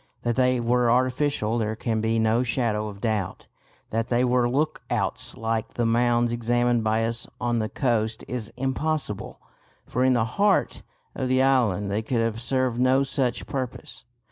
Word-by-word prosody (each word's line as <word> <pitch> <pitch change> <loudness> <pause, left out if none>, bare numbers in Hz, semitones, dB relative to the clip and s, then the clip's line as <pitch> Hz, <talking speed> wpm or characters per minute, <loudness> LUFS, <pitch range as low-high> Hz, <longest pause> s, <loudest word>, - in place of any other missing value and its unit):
That 120 -1 0
they 125 -1 +2
were 120 0 +2
artificial 125 -2 +1
there 110 0 -1
can 110 -1 -1
be 110 +1 +1
no 110 +1 +2
shadow 115 -3 0
of 100 -1 -9
doubt. 110 -5 -2 0.5
That 115 +1 -1
they 125 +1 +2
were 125 -1 +2
look 150 +5 0
outs - - -1
like 115 0 -2
the 120 - 0
mounds 120 +1 +2
examined 120 0 +1
by 110 +1 +1
us 115 +1 -2
on 120 -1 0
the 110 -1 -2
coast 110 -4 -1
is 120 -4 -5
impossible, 135 -3 -2 0.5
for 125 - -1
in 130 0 +4
the 115 -2 +2
heart 200 - +1 0.3
of 130 -2 -3
the 130 +1 +3
island 110 -7 +2
they 105 +2 0
could 115 +2 -1
have 115 0 -1
served 130 -1 0
no 130 +2 +4
such 130 -3 -1
purpose. 130 -1 -5
120 Hz, 170 wpm, -25 LUFS, 110-130 Hz, 0.5 s, in